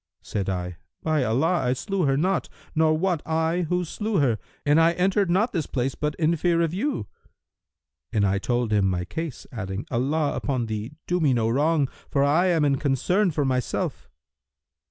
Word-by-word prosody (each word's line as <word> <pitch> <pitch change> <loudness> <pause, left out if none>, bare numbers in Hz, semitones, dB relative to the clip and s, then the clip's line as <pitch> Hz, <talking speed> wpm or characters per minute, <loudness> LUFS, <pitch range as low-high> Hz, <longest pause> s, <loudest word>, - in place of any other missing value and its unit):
Said 100 -2 -3
I, 90 -2 -3 0.3
'By 155 -3 +1
Allah, 140 +10 +2
I 125 0 +2
slew 190 +6 -1
her 135 -1 +2
not, 185 +6 0 0.2
nor 155 -1 +3
wot 175 -2 0
I 160 +2 0
who 180 0 +1
slew 210 +5 -2
her, 125 - +2 0.3
and 150 +2 +5
I 165 +1 +4
entered 190 +2 +1
not 205 +7 +2
this 165 -6 -1
place 130 0 -1
but 150 0 -2
in 165 +1 +2
fear 170 +1 +2
of 165 0 -1
you!' 205 - -1 1.1
And 105 -2 +2
I 100 0 +1
told 120 0 0
him 100 -2 +3
my 90 -1 -1
case, 160 - -5
adding, 95 -3 -5
'Allah 145 +5 0
upon 130 -4 -1
thee, 110 +4 -4
do 180 +1 0
me 145 -6 +3
no 115 -1 +1
wrong, 145 +3 +2 0.2
for 140 - +2
I 155 +6 +3
am 165 -4 +3
in 140 -1 +2
concern 165 - +2
for 150 -3 0
myself!' 130 -2 -2
150 Hz, 185 wpm, -25 LUFS, 120-170 Hz, 1.1 s, and